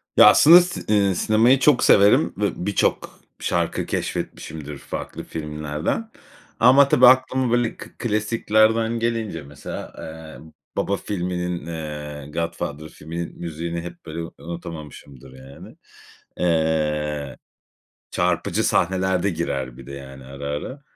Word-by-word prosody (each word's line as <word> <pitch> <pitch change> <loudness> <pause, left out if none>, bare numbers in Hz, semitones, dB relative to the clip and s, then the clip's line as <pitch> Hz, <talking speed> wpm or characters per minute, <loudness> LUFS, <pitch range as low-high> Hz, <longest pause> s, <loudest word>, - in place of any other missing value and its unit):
Ya, - - +8
aslında 170 +4 +8
si 180 +1 -4
eee, 100 -3 +3
sinemayı 115 +8 +4
çok 140 -1 +4
severim 100 -4 +5
ve 100 -3 -2
birçok 100 - -1 0.2
şarkı - - -1
keşfetmişimdir 75 -2 -5
farklı - - -7
filmlerden 75 - -4 0.5
ama 130 +4 +7
tabii 125 -2 +6
aklıma 130 -1 +4
böyle 120 -1 +1
k - - -10
klasiklerden 110 +1 +1
gelince 115 -8 -2
mesela, 70 0 -8
eee, 80 0 -10 0.3
"Baba" 100 0 0
filminin, 90 -3 -3
eee, 75 -3 -6
"Godfather" 85 -2 -4
filminin 85 +3 -7
müziğini 85 0 -4
hep 85 0 -10
böyle 80 +1 -5
u 80 - -9
unutamamışımdır, 75 -6 -9
yani. 65 +1 -13 0.6
Eee, 75 -4 0 0.7
çarpıcı - - 0
sahnelerde 95 +1 +1
girer 70 -7 -3
bir 65 -2 -12
de 70 - -8
yani 70 -1 -10
ara, 70 +2 -8
ara. 75 - -5
85 Hz, 120 wpm, -22 LUFS, 75-110 Hz, 0.7 s, Ya